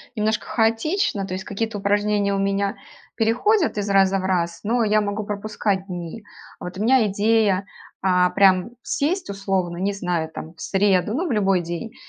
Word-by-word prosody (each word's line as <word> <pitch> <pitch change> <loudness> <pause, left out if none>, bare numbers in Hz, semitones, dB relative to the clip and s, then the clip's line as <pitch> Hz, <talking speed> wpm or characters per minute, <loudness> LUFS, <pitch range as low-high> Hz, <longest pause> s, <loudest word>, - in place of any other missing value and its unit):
немножко 215 0 0
хаотично, 225 - 0
то 185 - -5
есть 185 0 -4
какие-то 220 +1 -3
упражнения 205 0 +1
у 195 - 0
меня 200 +1 0 0.4
переходят 250 - +2
из 205 0 -2
раза 195 0 +4
в 185 - -5
раз, 170 -3 -1
но 230 +3 +1
я 215 0 +3
могу 210 +1 -2
пропускать 205 -1 -2
дни. 180 +4 -6 0.4
Вот 180 +1 -7
у 200 - -4
меня 250 -1 +4
идея- 205 -1 +2 0.4
а, 180 -1 +3
прям 185 0 +4
сесть, 360 +6 -1
условно, 190 -3 -2
не 195 +3 0
знаю, 180 -5 -2
там, 160 +1 -8
в 165 - -15
среду, 195 +1 +1
ну, 345 +6 -1
в 285 - -2
любой 195 -4 +2
день 175 +7 -6
200 Hz, 175 wpm, -22 LUFS, 190-220 Hz, 0.4 s, раза